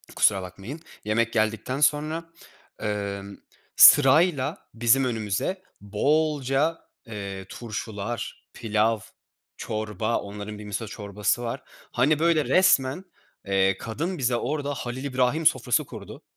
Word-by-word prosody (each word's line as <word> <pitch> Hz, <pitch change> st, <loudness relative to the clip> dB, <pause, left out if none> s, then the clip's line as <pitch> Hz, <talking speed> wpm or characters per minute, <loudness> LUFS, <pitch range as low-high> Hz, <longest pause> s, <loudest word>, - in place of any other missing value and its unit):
kusura 100 Hz, -3 st, +3 dB
bakmayın. 95 Hz, -, -8 dB, 0.3 s
Yemek 115 Hz, +2 st, +1 dB
geldikten 110 Hz, +5 st, 0 dB
sonra, 155 Hz, +3 st, +1 dB, 0.5 s
emm, 100 Hz, -1 st, -4 dB, 0.4 s
sırayla 145 Hz, 0 st, +6 dB
bizim 120 Hz, +3 st, +3 dB
önümüze 115 Hz, -, -2 dB, 0.2 s
bolca, 145 Hz, +7 st, +1 dB, 0.3 s
eee, 100 Hz, -3 st, -6 dB
turşular, 110 Hz, 0 st, -6 dB
pilav, 110 Hz, 0 st, +1 dB, 0.6 s
çorba, 110 Hz, +1 st, -2 dB
onların 105 Hz, +1 st, -7 dB
bir 105 Hz, -, -9 dB
miso 105 Hz, +2 st, -4 dB
çorbası 105 Hz, +2 st, -2 dB
var. 120 Hz, +3 st, -4 dB, 0.3 s
Hani 145 Hz, +5 st, +2 dB
böyle 165 Hz, -2 st, +3 dB
resmen, 180 Hz, -2 st, +3 dB, 0.4 s
eee, 95 Hz, -1 st, +2 dB
kadın 165 Hz, +12 st, -4 dB
bize 125 Hz, -2 st, +1 dB
orada 145 Hz, +3 st, -2 dB
Halil 125 Hz, 0 st, -5 dB
İbrahim 130 Hz, +3 st, 0 dB
sofrası 125 Hz, +2 st, +2 dB
kurdu. 110 Hz, -6 st, -10 dB
120 Hz, 110 wpm, -25 LUFS, 105-145 Hz, 0.6 s, sırayla